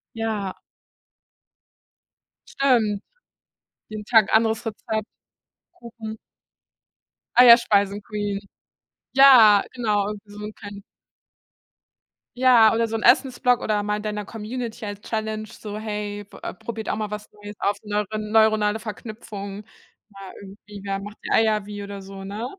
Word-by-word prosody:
Ja. 215 -4 -3 1.9
Stimmt. 225 -7 +1 0.9
Jeden 215 -1 -7
Tag 220 -3 +4
anderes 225 +1 +2
Rezept, 220 0 -4 0.6
Kuchen 225 -2 -9 1.2
Eierspeisen-Queen 205 -3 +4 0.7
Ja, 245 -7 +8
genau, 210 -5 0
irgendwie 210 -1 -8
so 205 - -11
'n 215 - -7
klein 205 -1 -10 1.6
Ja, 240 -4 +6
oder 230 0 +1
so 225 - -2
'n - - -6
Essens-Blog 250 0 +3
oder 210 -1 0
mal 210 0 -1
in 210 - -6
deiner 210 -1 -4
Community 225 +1 -6
als 205 -1 -6
Challenge 215 0 -4
so: 210 -1 -8
„Hey, 210 -1 -5
b - - -15
äh, - - -4
probiert 220 +3 -6
auch - - -1
mal 215 -1 -3
was 210 0 -7
Neues 205 0 -11
aus, 205 0 0
neure 210 0 -2
neuronale 215 0 +2
Verknüpfung.” 210 -2 -8 0.5
Ja, 195 -2 -11
irgendwie, 200 +1 -12
ja: 195 0 -2
„Macht 205 +1 -9
die - - -6
Eier 215 -2 +2
wie“ 205 0 -7
oder 200 -1 -7
so, 195 0 -10
ne? 210 +4 -5
210 Hz, 130 wpm, -23 LUFS, 205-225 Hz, 1.9 s, Ja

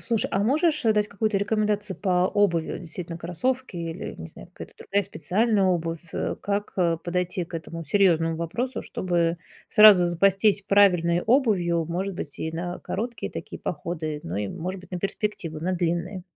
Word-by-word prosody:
Слушай, 230 -3 -1
а 195 - +2
можешь, 300 +4 +2
э, 225 - +5
дать 210 -1 +1
какую-то 210 0 0
рекомендацию 205 -1 -1
по 180 -1 +2
обуви, 175 -6 +1
э, - - -8
действительно 170 0 -7
кроссовки 230 +7 -2
или, 165 +1 -5
не 80 - -8
знаю, - - -13
какая-то - - -10
другая 200 +1 0
специальная 210 +1 +1
обувь, 165 -2 0
э. - - -2
Как, 205 0 -2
э, 170 -3 +2
подойти 180 0 -2
к 170 - -18
этому 165 +1 -6
серьезному 165 -2 +3
вопросу, 235 +11 -3
чтобы 170 -2 -1 0.3
сразу 210 -4 +8
запастись 195 +4 +3
правильной 180 -4 +4
обувью, 200 - +2
может 185 +4 -3
быть, 150 -4 -7
и 160 - -3
на 175 +2 -4
короткие 230 +4 -4
такие - - -7
походы, 155 -3 -4
но 85 +3 -5
и, 105 0 -1
может 185 +3 -5
быть, 185 - -17
на 180 - -2
перспективу, 195 -5 -3
на 180 +3 -1
длинные? 175 +1 -2
180 Hz, 170 wpm, -25 LUFS, 170-205 Hz, 0.3 s, сразу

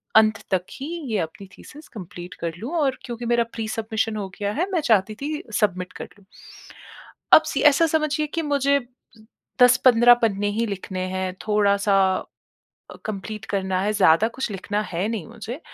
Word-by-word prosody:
अंत 220 0 +5
तक 185 -1 +1
ही 275 - -7 0.2
ये 215 - +1
अपनी 195 +4 -13
थीसिस 300 +1 -13
कंप्लीट 180 -3 -9
कर 165 -1 -2
लूँ 240 +8 -6
और 270 -4 +1
क्योंकि 240 -1 -6
मेरा 235 0 +2
प्री-सबमिशन 220 0 -2
हो 200 - -4
गया 205 0 -1
है 355 +6 -1
मैं 345 -4 +1
चाहती 215 0 +3
थी 300 +1 -3 0.2
सबमिट 185 -3 -1
कर - - -4
लूँ। 200 - -23 1.1
अब - - -15
सि - - 0
ऐसा 330 +4 +3
समझिए 305 0 0
कि 330 +3 -3
मुझे 280 0 +3 0.8
10-15 245 -1 +7
पन्ने 205 -2 +1
ही 230 - +2
लिखने 190 -2 -5
हैं 185 -1 -2
थोड़ा-सा 200 -1 +3 1.1
कंप्लीट 215 +1 -5
करना 190 -2 -1
है, 210 - 0
ज़्यादा 205 +1 +4
कुछ 245 +1 -4
लिखना 205 +1 -3
है 180 +4 -1
नहीं 220 -6 -4
मुझे। 230 +3 -8
215 Hz, 165 wpm, -23 LUFS, 195-250 Hz, 1.1 s, 10-15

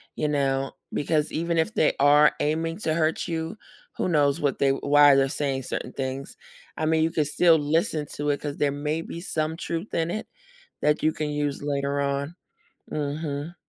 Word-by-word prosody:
you 150 - -1
know, 135 -2 0 0.2
because 150 0 0
even 170 +1 -1
if 165 +7 +1
they 155 - +3
are 145 +2 +6
aiming 165 +2 -1
to 160 -7 0
hurt 160 0 0
you, 165 +4 -3 0.4
who - - 0
knows 145 -2 +2
what 140 -2 0
they 140 - +3
why 145 +1 +5
they're 135 0 +3
saying 135 -2 -2
certain - - -5
things. 135 0 -4 0.4
I 155 - -1
mean, 160 0 +2
you 165 - +1
could 155 -3 0
still 165 +2 +4
listen 150 0 0
to 145 0 -2
it, 145 - 0
'cause 145 -1 -4
there 145 -1 +1
may 150 +3 -2
be 165 0 -7
some 160 -3 -2
truth 170 +2 -4
in 165 0 0
it 215 - -4 0.5
that 150 +1 +2
you 155 - +4
can 155 -1 -3
use 145 -1 -2
later 140 0 -1
on. 140 +3 -2 0.6
Mhm. 150 +2 -3
150 Hz, 190 wpm, -25 LUFS, 140-160 Hz, 0.6 s, are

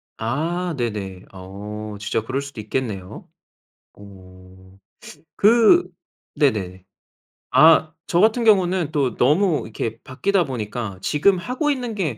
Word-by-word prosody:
아 165 +9 -2
네네. 100 -6 -4
어 105 +3 -8
진짜 105 +1 -2
그럴 130 +4 -3
수도 140 -5 -8
있겠네요. 105 -4 -5 0.7
오. 95 -1 -16 0.6
그 230 - +5 0.4
네네. 95 - -1 0.7
아 160 0 +5 0.2
저 170 - +3
같은 225 +2 +3
경우는 185 -6 +2
또 140 -4 0
너무 155 +5 +2
이렇게 110 +1 -5
바뀌다 185 +8 0
보니까 110 -5 -5
지금 165 - +2
하고 255 - -2
있는 250 -5 -2
게 160 - -3
130 Hz, 215 characters per minute, -21 LUFS, -, 0.7 s, 그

